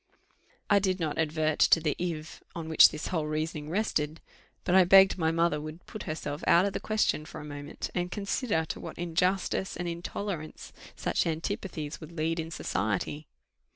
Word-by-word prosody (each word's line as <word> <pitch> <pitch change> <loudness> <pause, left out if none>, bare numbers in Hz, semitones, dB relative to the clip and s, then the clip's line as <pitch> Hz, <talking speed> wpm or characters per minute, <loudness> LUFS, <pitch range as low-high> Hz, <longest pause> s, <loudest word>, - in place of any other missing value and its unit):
I 205 - +5
did 190 -1 0
not 160 -2 -2
advert 155 -1 0
to - - +6
the 155 -2 -1
if, 165 -3 -4
on 165 -2 -5
which 160 - +8
this 155 - -5
whole 160 -4 -1
reasoning 155 0 -3
rested, 160 -5 -1 0.4
but 180 - 0
I 190 0 +8
begged 190 +2 +7
my 160 -1 +2
mother 165 -2 +1
would 155 +3 -8
put 215 - -8
herself 155 -1 -4
out 175 +3 +6
of 200 - -1
the - - -2
question 215 -7 +1
for 155 - -9
one 150 - -8
moment, 145 +1 -6
and 180 0 -1
consider 200 -3 -1
to - - -5
what - - -8
injustice 180 +3 0
and 175 0 -3
intolerance 170 -1 -5 0.2
such - - 0
antipathies 165 -2 -4
would 160 +1 -10
lead 165 +1 -1
in 160 0 -3
society. 140 - -2
165 Hz, 180 wpm, -29 LUFS, 155-185 Hz, 0.4 s, which